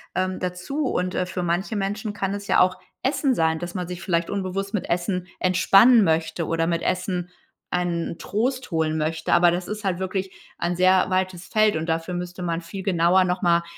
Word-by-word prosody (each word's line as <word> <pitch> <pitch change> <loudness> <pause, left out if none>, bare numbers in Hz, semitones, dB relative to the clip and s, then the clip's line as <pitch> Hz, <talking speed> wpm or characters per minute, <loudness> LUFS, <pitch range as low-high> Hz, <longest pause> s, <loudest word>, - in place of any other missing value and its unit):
ähm, 185 0 -1
dazu. 180 +12 -3
Und, 180 -6 -1
äh, 185 - 0
für 180 0 -4
manche 175 +6 -1
Menschen 205 +2 -2
kann 195 -2 -2
es 200 0 -7
ja - - +3
auch 185 0 +3 0.2
Essen 270 0 +1
sein, 160 0 +2
dass 175 0 -6
man 180 -2 -3
sich 180 0 -6
vielleicht 170 -3 0
unbewusst 195 +1 -3
mit 200 - -3
Essen 180 +1 -1
entspannen 195 +5 +6
möchte 160 0 0
oder 165 +1 0
mit 170 -1 -1
Essen 180 -1 -1 0.4
einen 170 -2 -2
Trost 255 +5 -2
holen 160 -3 0
möchte. 155 +1 -1
Aber 175 0 +6
das 175 +1 -2
ist 210 0 -5
halt 190 -3 0
wirklich 190 0 -3 0.3
ein 175 +1 -1
sehr 185 +1 +4
weites 185 -1 -1
Feld 215 -1 +3
und 160 +2 -2
dafür 165 +2 -1
müsste 180 0 -5
man 170 -1 -2
viel 190 +3 -7
genauer 180 0 +3
noch 180 0 -1
mal 170 -2 +3
180 Hz, 200 wpm, -24 LUFS, 170-195 Hz, 0.4 s, entspannen